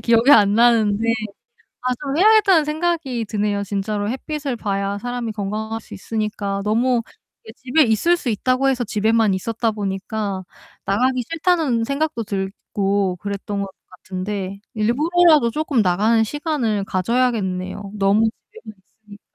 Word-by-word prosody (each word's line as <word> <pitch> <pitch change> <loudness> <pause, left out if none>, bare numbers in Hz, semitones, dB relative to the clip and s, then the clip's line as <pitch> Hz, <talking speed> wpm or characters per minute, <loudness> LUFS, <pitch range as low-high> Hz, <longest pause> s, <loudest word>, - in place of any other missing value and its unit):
기억이 230 +3 +4
안 205 -6 +6
나는데 225 -2 +3 0.8
아 255 0 0
좀 280 0 -2
해야겠다는 410 -5 +5
생각이 300 -6 -1
드네요. 205 -1 -1
진짜로 205 +1 -2
햇빛을 280 0 -4
봐야 200 -2 -2
사람이 245 0 -4
건강할 215 +2 -4
수 - - -12
있으니까 205 -1 -3
너무 235 +3 +2 0.4
이렇게 220 - -11
집에 265 +5 +3
있을 270 +8 +3
수 275 - -5
있다고 255 +5 +1
해서 255 -2 0
집에만 220 0 +2
있었다 230 +4 -1
보니까 200 -1 -3 0.4
나가기 250 +5 +1
싫다는 320 -8 +1
생각도 280 -2 -2
들고 195 -1 -2
그랬던 200 +1 -4
것 195 - -4 0.2
같은데 190 +2 -5
일부러라도 300 +5 +3
쪼끔 295 -2 0
나가는 210 +5 +2
시간을 250 -6 -1
가져야겠네요 195 -2 -1
너무 205 +2 +3 0.2
집에만 420 - -12 0.4
있으니까. 205 0 -16
220 Hz, 340 characters per minute, -21 LUFS, 200-255 Hz, 0.8 s, 안